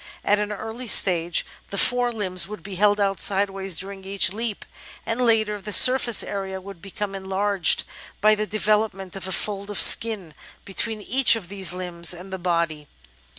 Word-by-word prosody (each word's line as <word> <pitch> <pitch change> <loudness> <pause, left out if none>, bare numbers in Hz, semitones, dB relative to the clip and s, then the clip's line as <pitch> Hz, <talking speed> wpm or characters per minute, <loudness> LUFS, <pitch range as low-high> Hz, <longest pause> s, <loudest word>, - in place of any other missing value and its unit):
At 205 0 +3
an 210 0 -3
early 225 +4 -7
stage 175 -5 +3 0.2
the 200 - -6
fore 245 +3 +2
limbs 185 -5 -4
would 210 -5 -9
be 195 +1 -8
held 205 +2 +2
out 195 -2 0
sideways 195 -2 +1
during 195 +2 -8
each 195 -1 +1
leap, 220 -1 -4 0.4
and 225 +2 -2
later 220 -3 +1
the 210 - -7
surface 250 0 +5
area 195 -1 -5
would 190 -2 -12
become 200 +1 -6
enlarged 195 -1 +1 0.4
by 215 +1 +4
the 215 0 -2
develop 215 0 0
ment 190 -1 -10
of 190 -1 -5
a - - -5
fold 200 +1 -2
of 205 - -2
skin 210 -8 +4 0.3
between 210 +2 -3
each 260 0 +4
of 195 -6 -8
these 190 -4 -2
limbs 175 -1 -1
and 185 +2 -11
the 190 - -5
body. 170 -4 -2
200 Hz, 180 wpm, -23 LUFS, 190-215 Hz, 0.4 s, surface